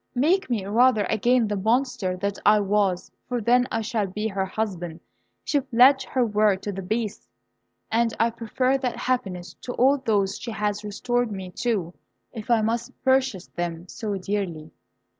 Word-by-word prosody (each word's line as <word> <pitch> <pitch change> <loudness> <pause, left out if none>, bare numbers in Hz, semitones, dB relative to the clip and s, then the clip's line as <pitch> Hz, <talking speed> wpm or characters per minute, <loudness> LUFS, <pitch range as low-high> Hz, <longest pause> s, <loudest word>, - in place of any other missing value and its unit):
Make 335 +9 +2
me, 220 -6 -1
rather, 225 +1 +4
again 235 +2 +3
the 205 - -1
Monster 225 -2 0
that 200 +1 -3
I 210 +1 +6
was, 200 -2 0 0.2
for 245 -1 -1
then 245 +3 +3
I 225 - 0
shall 215 -2 -1
be 210 +4 -3
her 190 -1 -2
husband. 180 -5 -4 0.4
She 290 - +1
pledged 265 +1 +5
her 255 -2 +1
word 210 -3 +2
to 205 - -2
the 195 0 -5
Beast, 215 +2 -3 0.6
and 230 0 +2
I 230 +1 +3
prefer 255 +4 0
that 255 -2 -2
happiness 195 -9 -2
to 245 - -5
all 275 +3 +3
those 205 -6 0
she 240 - -6
has 210 -1 -2
restored 240 +3 -1
me 190 -2 -6
to, 210 -8 -1 0.4
if 225 -1 -8
I 230 -2 +4
must 235 +3 -2
purchase 260 -8 +2
them 175 0 -4
so 210 +2 -4
dearly!" 180 -5 -3
220 Hz, 170 wpm, -25 LUFS, 195-245 Hz, 0.6 s, I